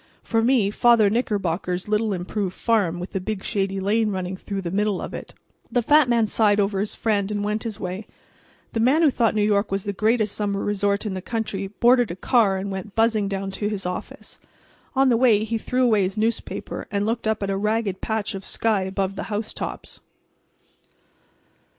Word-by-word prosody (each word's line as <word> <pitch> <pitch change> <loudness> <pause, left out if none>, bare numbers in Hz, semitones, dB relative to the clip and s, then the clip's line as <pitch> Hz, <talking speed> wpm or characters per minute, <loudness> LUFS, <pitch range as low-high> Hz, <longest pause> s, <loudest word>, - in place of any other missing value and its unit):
For 225 0 +1
me 230 -4 +3
Father 225 -2 +4
Knickerbocker's 185 -6 -1
little 215 +1 +1
improved 190 +1 -3
farm 200 -7 +1
with 180 - -6
the 195 - -2
big 200 0 -4
shady 195 -3 -1
lane 215 +3 +1
running 185 -1 -3
through 195 +1 -5
the 170 - -3
middle 205 0 0
of - - -6
it." - - -8 0.4
The 245 -2 +1
fat 295 +1 +5
man 235 -2 +3
sighed 210 -1 +2
over 195 -1 +1
his 205 +1 -1
friend 205 -3 0
and 205 -1 -2
went 210 +1 -1
his 220 -2 -5
way. 185 +3 -5 0.7
The 225 - -1
man 265 +8 +4
who 300 - +5
thought 230 -3 +1
New 210 - +2
York 205 0 +2
was 195 -1 -1
the 200 - -3
greatest 215 +1 +1
summer 200 -1 -1
resort 205 0 0
in 205 - -2
the 185 - -4
country 210 -3 -3
boarded 240 +3 +3
a 170 - -4
car 200 -1 +2
and 195 +1 -4
went 190 +1 -6
buzzing 225 -2 +2
down 195 0 -3
to 205 +2 -2
his 200 -3 -4
office. 180 0 -6 0.6
On 270 0 +4
the 235 - +4
way 225 -4 +4
he 225 +1 -2
threw 255 +3 0
away 220 -4 +4
his 190 +2 -1
newspaper 225 +2 -3
and 205 -1 -1
looked 225 0 -1
up 220 -2 0
at 195 - -1
a - - 0
ragged 210 -1 -1
patch 220 -1 -2
of 195 0 -6
sky 220 -1 0
above 190 0 -2
the - - -4
housetops. 215 +1 -5
210 Hz, 200 wpm, -23 LUFS, 195-225 Hz, 0.7 s, fat